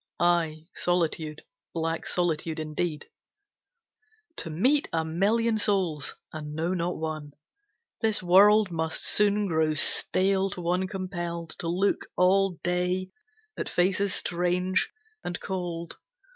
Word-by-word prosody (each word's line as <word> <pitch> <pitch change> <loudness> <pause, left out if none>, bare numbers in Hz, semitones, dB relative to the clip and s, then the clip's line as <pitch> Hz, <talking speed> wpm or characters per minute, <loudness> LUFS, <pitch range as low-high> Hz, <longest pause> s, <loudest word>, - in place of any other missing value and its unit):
Aye, 165 -3 +1
solitude, 160 -3 -1 0.3
black 165 0 -2
solitude 165 -2 -1
indeed, 155 0 -3 1.3
To 165 - -5
meet 255 - +2
a 160 -1 0
million 215 +7 +1
souls 185 -9 +1 0.2
and 150 -1 -6
know 165 +3 -1
not 175 0 -2
one; 155 -2 -5 0.7
This 220 -4 +2
world 200 +3 +6
must 160 -1 0
soon 210 0 +3
grow 160 -4 +1
stale 190 +5 +3
to 180 - -6
one 180 +2 0
compelled 175 -3 -5
To 170 - -4
look 185 +4 0
all 185 0 +3
day 180 +1 -1 0.4
at - - -4
faces 190 +2 +1
strange 180 +1 0 0.3
and 175 - -4
cold. 175 -3 -5
175 Hz, 115 wpm, -27 LUFS, 160-190 Hz, 1.3 s, world